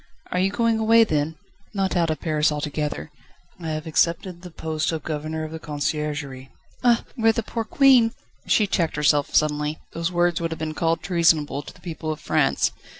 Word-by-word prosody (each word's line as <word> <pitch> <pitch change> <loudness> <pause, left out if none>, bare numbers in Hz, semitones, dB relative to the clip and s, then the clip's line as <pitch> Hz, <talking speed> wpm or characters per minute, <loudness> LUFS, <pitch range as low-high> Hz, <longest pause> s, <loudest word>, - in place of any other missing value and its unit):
"Are 180 - 0
you 190 +1 +3
going 230 +2 +1
away 225 +1 +6
then?" 155 -5 -1 0.4
"Not 195 -1 0
out 170 -2 +2
of 155 - -2
Paris 155 -2 +1
altogether. 150 - -3 0.5
I 165 -2 -5
have 155 0 -3
accepted 170 +2 0
the 180 - -9
post 160 -1 -2
of 160 -2 -4
Governor 155 +1 -3
of 155 - -6
the 160 - -6
Conciergerie." 145 -3 -3 0.3
"Ah! 240 -1 +4
where 225 -3 +4
the 225 0 -2
poor 230 +1 -3
Queen 255 -2 +5 0.2
..." - - -33
She 215 - +4
checked 175 -4 0
herself 150 -1 +2
suddenly. 150 0 +1 0.2
Those 165 +2 -2
words 175 -1 +1
would 165 - -1
have 160 - -4
been 155 0 -4
called 165 +1 0
treasonable 165 -5 +2
to - - -11
the - - -19
people 160 -2 -4
of 155 - -5
France. - - +1
160 Hz, 195 wpm, -23 LUFS, 150-185 Hz, 0.5 s, away